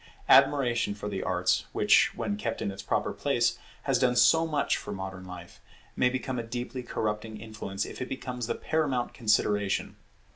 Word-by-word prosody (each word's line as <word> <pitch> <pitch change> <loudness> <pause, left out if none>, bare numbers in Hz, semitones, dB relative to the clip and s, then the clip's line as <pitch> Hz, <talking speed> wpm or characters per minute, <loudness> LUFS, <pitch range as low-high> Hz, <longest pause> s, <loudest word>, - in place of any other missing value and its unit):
Admiration 135 -6 +4
for 105 0 -6
the 100 -2 -3
arts, 90 -1 +1
which, - - +4
when 100 - -2
kept 115 +2 -3
in 100 - -2
its 95 - -8
proper - - -1
place, - - 0 0.2
has - - +1
done 125 -1 +3
so 160 +7 +5
much 150 -3 +1
for 105 - -6
modern 95 -1 -6
life, 90 -1 -11 0.3
may 125 - +3
become 130 0 -3
a - - -3
deeply 120 +2 -5
corrupting 110 -2 -3
influence, 105 -2 -5
if - - -8
it 125 - -4
becomes 125 -3 -4
the - - -1
paramount 140 -6 -1
consideration. 105 -3 +1
115 Hz, 175 wpm, -28 LUFS, 105-125 Hz, 0.3 s, so